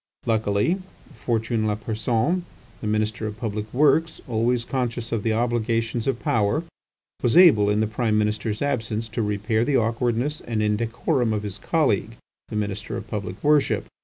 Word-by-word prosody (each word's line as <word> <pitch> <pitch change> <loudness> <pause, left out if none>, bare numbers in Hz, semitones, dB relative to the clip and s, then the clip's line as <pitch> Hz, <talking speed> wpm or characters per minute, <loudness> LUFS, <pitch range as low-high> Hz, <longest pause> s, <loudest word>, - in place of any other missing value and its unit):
Luckily, 110 - +1 0.5
Fortuné 115 -1 +1
Lapersonne, 110 - 0 0.4
the 110 - -3
Minister 110 +1 -1
of 105 0 -6
Public 110 -2 -4
Works, 150 +4 +3
always 120 0 +1
conscious 120 -3 -2
of 115 -2 0
the 115 - 0
obligations 115 0 0
of 130 -3 0
power, 110 +9 +1 0.6
was 120 +6 +2
able 130 - +7
in 105 +1 +2
the - - +3
Prime 110 0 0
Minister's 105 +2 -1
absence 115 -5 -1
to 115 +1 -2
repair 105 +2 0
the 140 +2 +2
awkwardness 120 +5 0
and 115 -2 -3
indecorum 115 +4 0
of 105 -1 -2
his 100 -1 -5
colleague, 115 - 0 0.3
the - - -7
Minister 105 0 -3
of 115 -2 -8
Public 100 -3 -5
Worship. 150 -1 +3
115 Hz, 155 wpm, -24 LUFS, 105-120 Hz, 0.6 s, able